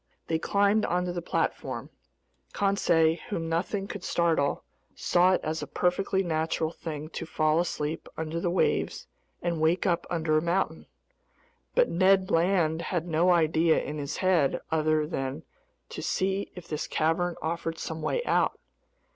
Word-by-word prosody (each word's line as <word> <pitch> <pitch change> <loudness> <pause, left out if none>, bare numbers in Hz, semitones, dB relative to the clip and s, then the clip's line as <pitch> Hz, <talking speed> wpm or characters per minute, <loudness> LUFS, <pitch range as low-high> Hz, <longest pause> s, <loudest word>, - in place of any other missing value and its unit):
They 160 -1 0
climbed 200 +4 +2
onto 180 +1 0
the 175 0 -3
platform. - - -2 0.6
Conseil, 170 -5 +3
whom 165 -5 -2
nothing 190 +4 -1
could 205 -3 -7
startle, 165 -6 +1 0.3
saw 180 +2 +3
it - - +1
as 155 +1 -2
a - - -5
perfectly 190 +2 0
natural 160 -1 -1
thing 155 -2 -6
to 165 - -5
fall 155 0 +2
asleep 160 -2 -2
under 160 +1 -3
the 175 - 0
waves 180 - 0 0.4
and 170 -2 -1
wake 165 +3 +2
up 175 -3 +1
under 160 -2 0
a 155 - +4
mountain. 175 +4 -1 0.9
But - - +5
Ned 190 +1 +3
Land 165 -2 +2
had 175 -1 -2
no 170 +2 +2
idea 160 -1 +4
in 150 +1 -5
his 145 +1 -4
head 180 -7 +2
other 155 -1 +2
than 135 -4 -4 0.5
to - - -6
see 195 +1 -1
if 180 -2 -10
this 150 0 -3
cavern 165 +2 0
offered 165 0 -3
some 160 0 -5
way 485 - -1
out. - - +1
170 Hz, 155 wpm, -28 LUFS, 160-180 Hz, 0.9 s, But